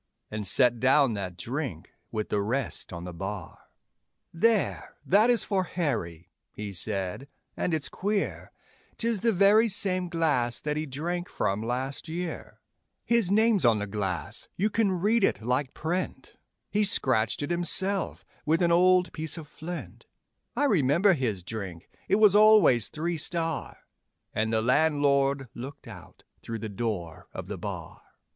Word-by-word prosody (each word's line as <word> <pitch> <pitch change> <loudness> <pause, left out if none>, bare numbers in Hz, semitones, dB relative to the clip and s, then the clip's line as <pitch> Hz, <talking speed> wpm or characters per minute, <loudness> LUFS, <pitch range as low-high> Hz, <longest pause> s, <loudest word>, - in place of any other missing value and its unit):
And 105 -2 -4
set 120 -2 +4
down 135 0 +4
that 95 -4 -5
drink 125 - -5 0.2
with 110 -1 -3
the 105 - +1
rest 115 - -2
on 85 0 -6
the 90 0 -7
bar. 95 +1 -7 0.7
'There, 215 +4 +1
that 210 +6 +4
is 240 -2 +3
for 190 -3 0
Harry,' 90 - -3 0.2
he 105 -1 -6
said, 95 +6 -3 0.3
'and - - -1
it's 155 -3 -1
queer, 205 +1 -2 0.5
'Tis 230 -2 0
the 230 - +3
very 205 +3 +5
same 185 -3 0
glass 145 -9 +1
that 150 0 -2
he 155 +1 -2
drank 175 +6 -3
from 100 +2 -1
last 130 +6 -3
year; 175 +1 -6 0.4
His 235 -6 +2
name's 215 -1 +3
on 115 -3 +5
the 105 - -2
glass, 95 -4 -3
you 210 +4 0
can 215 -2 +2
read 205 +5 +2
it 155 - +1
like 125 +3 0
print, 175 +4 -3 0.4
He 210 +1 +2
scratched 130 - +1
it 145 - -3
himself 185 +2 0 0.2
with 165 +3 +2
an 170 - +3
old 180 +1 +4
piece 160 0 -2
of 160 -2 -8
flint; 170 +4 -8 0.5
I - - +1
remember 185 - +4
his 115 - -2
drink 95 -4 -7 0.2
it - - +3
was 210 -2 +5
always 210 - +6
Three 165 +6 -3
Star' 165 +1 -2 0.6
And 110 +1 0
the 110 -1 +1
landlord 140 0 +2
looked 135 +3 -9
out 95 -6 -12 0.2
through 115 - -5
the 110 0 -5
door 100 -7 -4
of - - -5
the - - -6
bar. - - -7
145 Hz, 155 wpm, -27 LUFS, 110-185 Hz, 0.7 s, always